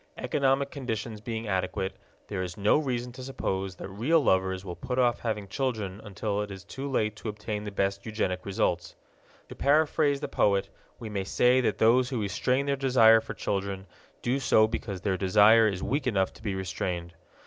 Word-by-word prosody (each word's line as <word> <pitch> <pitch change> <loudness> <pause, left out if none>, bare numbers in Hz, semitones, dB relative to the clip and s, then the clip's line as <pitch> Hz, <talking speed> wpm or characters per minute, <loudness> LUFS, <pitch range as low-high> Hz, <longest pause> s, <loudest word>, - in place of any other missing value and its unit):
Economic 140 0 +1
conditions 115 -5 -4
being 115 0 -4
adequate, 95 0 -2 0.3
there 100 -3 -3
is 90 -1 -5
no 105 +8 +3
reason 125 -4 -2
to 130 +2 -10
suppose 95 -8 -3
that - - -7
real 120 - +2
lovers 95 -6 +1
will 90 -2 -5
put 125 +6 -4
off 120 -2 +3
having 105 -3 -3
children 110 -4 -3
until 105 0 -3
it 105 - -4
is 95 -1 -8
too 135 +7 -6
late 110 -5 0
to 110 - -6
obtain 105 0 -4
the 105 - -4
best 100 0 -1
eugenic 95 -4 -2
results. 90 -3 -1 0.5
To - - -7
paraphrase 145 0 +2
the - - -4
poet, 100 -1 +1 0.3
we 115 - -7
may 100 -2 -2
say 125 +6 +3
that 105 -5 0
those 120 +4 +4
who 125 -4 -2
restrain 125 +7 0
their 140 0 +1
desire 125 -5 +5
for 105 -1 -7
children 100 -1 -3 0.4
do 125 +3 +1
so 110 -4 +4
because 100 -4 -4
their 95 -2 0
desire 105 +4 +6
is 95 -3 -2
weak 135 +4 -1
enough 95 -5 +1
to - - -16
be 105 -3 -2
restrained. 90 -2 -3
105 Hz, 190 wpm, -28 LUFS, 95-125 Hz, 0.5 s, desire